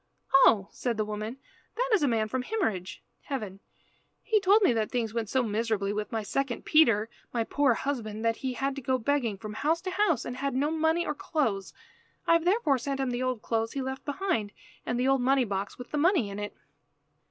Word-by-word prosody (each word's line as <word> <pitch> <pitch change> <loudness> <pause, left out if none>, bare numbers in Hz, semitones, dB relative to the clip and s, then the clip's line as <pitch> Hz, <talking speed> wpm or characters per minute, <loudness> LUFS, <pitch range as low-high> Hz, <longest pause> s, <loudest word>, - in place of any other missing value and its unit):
"Oh," 220 -7 +6
said 240 -3 -2
the 215 - 0
woman, 215 +3 -5 0.4
"that - - -1
is 425 - +4
a 290 - +3
man 225 -3 +1
from 260 +4 -2
Himmerige 220 - -2 0.2
(Heaven). 210 -9 -4 0.6
He 435 -2 +3
told 405 +3 +5
me 365 - +5
that 220 -2 0
things 230 -4 -2
went 230 -3 -2
so 260 -1 +2
miserably 215 -2 -1
with 210 -1 -3
my 225 -2 -2
second 260 +3 -2
Peter, 230 -9 +4 0.2
my 235 -2 0
poor 270 0 +2
husband, 225 -6 -3
that 230 0 +2
he 260 -2 -3
had 270 +3 -2
to - - -4
go 260 0 +1
begging 245 -4 0
from 210 +2 -7
house 310 +8 +1
to 370 0 -4
house 370 - +1
and 245 - -5
had 275 0 -2
no 290 +4 +1
money 320 +1 +1
or - - -1
clothes. 225 - -1 0.5
I - - +4
have 335 0 +3
therefore 355 - +3
sent 275 +2 -3
him 265 -2 0
the 245 +1 -2
old 255 -3 -2
clothes 225 -1 -1
he 275 - -2
left 265 +1 -5
behind, 285 - -1 0.3
and 240 - 0
the 255 - +2
old 270 -1 +3
money 265 +1 +3
box 195 -1 -3
with 245 - -10
the 295 - 0
money 320 - +3
in 200 - -6
it." 205 0 -6
250 Hz, 220 wpm, -28 LUFS, 220-290 Hz, 0.6 s, Oh